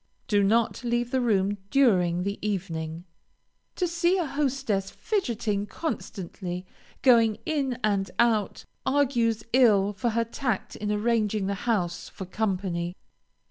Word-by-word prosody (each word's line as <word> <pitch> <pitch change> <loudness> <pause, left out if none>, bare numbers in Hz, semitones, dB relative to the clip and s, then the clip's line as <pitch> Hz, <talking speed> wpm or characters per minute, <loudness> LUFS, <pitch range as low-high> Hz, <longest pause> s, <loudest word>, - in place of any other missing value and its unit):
Do 205 -1 +3
not 225 +4 +2
leave 240 0 0
the 260 - +1
room 205 -3 +1
during 180 -10 +3
the 200 +1 -3
evening. 170 -5 -3 0.7
To 360 - 0
see 345 +2 +2
a 355 - 0
hostess 265 -9 -1
fidgeting, 225 - -1
constantly 185 - -5 0.4
going 230 -4 +5
in 275 -6 -1
and 200 -2 +1
out, 220 -4 +1 0.2
argues 245 -5 +1
ill 210 -6 +5
for 205 +5 -1
her 230 +1 0
tact 235 -2 -3
in 210 0 -3
arranging 215 -1 +1
the 200 - 0 0.2
house 175 -6 -1
for 190 - -8
company. 185 -3 -2
215 Hz, 130 wpm, -27 LUFS, 195-245 Hz, 0.7 s, going